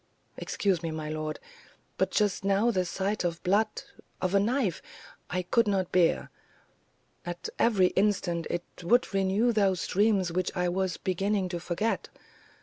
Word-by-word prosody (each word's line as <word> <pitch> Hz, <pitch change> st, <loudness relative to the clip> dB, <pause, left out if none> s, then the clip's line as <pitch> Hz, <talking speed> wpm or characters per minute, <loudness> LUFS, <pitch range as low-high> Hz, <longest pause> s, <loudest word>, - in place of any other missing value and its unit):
"Excuse 190 Hz, -5 st, -1 dB
me, 165 Hz, -, -3 dB
my 155 Hz, -1 st, -4 dB
lord; 155 Hz, 0 st, -4 dB, 0.6 s
but -, -, +2 dB
just 205 Hz, -3 st, +1 dB
now 200 Hz, +4 st, +3 dB
the 185 Hz, -4 st, 0 dB
sight 195 Hz, +4 st, -2 dB
of 170 Hz, -1 st, -2 dB
blood 210 Hz, +4 st, +1 dB, 0.4 s
of 185 Hz, 0 st, -1 dB
a 200 Hz, -, +5 dB
knife 220 Hz, -, 0 dB, 0.5 s
I 180 Hz, 0 st, -1 dB
could 230 Hz, +5 st, +2 dB
not 190 Hz, -3 st, 0 dB
bear; 175 Hz, -2 st, +2 dB, 0.9 s
at 175 Hz, 0 st, -5 dB
every 195 Hz, -6 st, +4 dB
instant 190 Hz, -4 st, 0 dB
it 175 Hz, -, -2 dB, 0.2 s
would 230 Hz, +6 st, +2 dB
renew 195 Hz, +5 st, +2 dB
those 195 Hz, -5 st, +1 dB
dreams 200 Hz, -3 st, +2 dB
which 185 Hz, +1 st, 0 dB
I 180 Hz, 0 st, +1 dB
was 185 Hz, 0 st, -1 dB
beginning 195 Hz, +1 st, -1 dB
to 175 Hz, -1 st, -3 dB
forget. 180 Hz, +6 st, -2 dB
190 Hz, 150 wpm, -28 LUFS, 175-205 Hz, 0.9 s, a